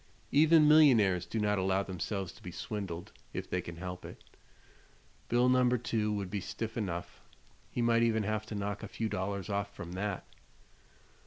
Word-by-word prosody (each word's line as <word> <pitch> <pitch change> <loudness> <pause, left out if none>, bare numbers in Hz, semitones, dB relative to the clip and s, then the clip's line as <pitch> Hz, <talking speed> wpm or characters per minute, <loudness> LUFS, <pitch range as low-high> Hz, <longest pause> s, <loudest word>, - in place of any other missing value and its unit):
Even 155 +1 +6
millionaires 115 - +6
do 115 - -2
not 105 -1 +1
allow 95 +1 +1
themselves 95 0 -4
to - - -17
be 90 - -7
swindled, 90 -2 -5 0.2
if - - -4
they 90 - -1
can 85 -1 -8
help 90 +1 -6
it. - - -10 1.1
Bill 120 +1 +4
No. 125 -1 +4
2 110 -2 -1
would 100 -3 -3
be 100 -1 -2
stiff 115 +4 -5
enough; 90 -6 -4 0.5
he 120 - -1
might 115 0 +4
even 110 -2 +2
have 110 +1 -2
to 110 - -5
knock 100 0 -3
a - - -5
few 115 - -3
dollars 100 0 -3
off 100 -1 -2
from 85 - -7
that. 95 +1 -3
105 Hz, 175 wpm, -32 LUFS, 95-115 Hz, 1.1 s, Even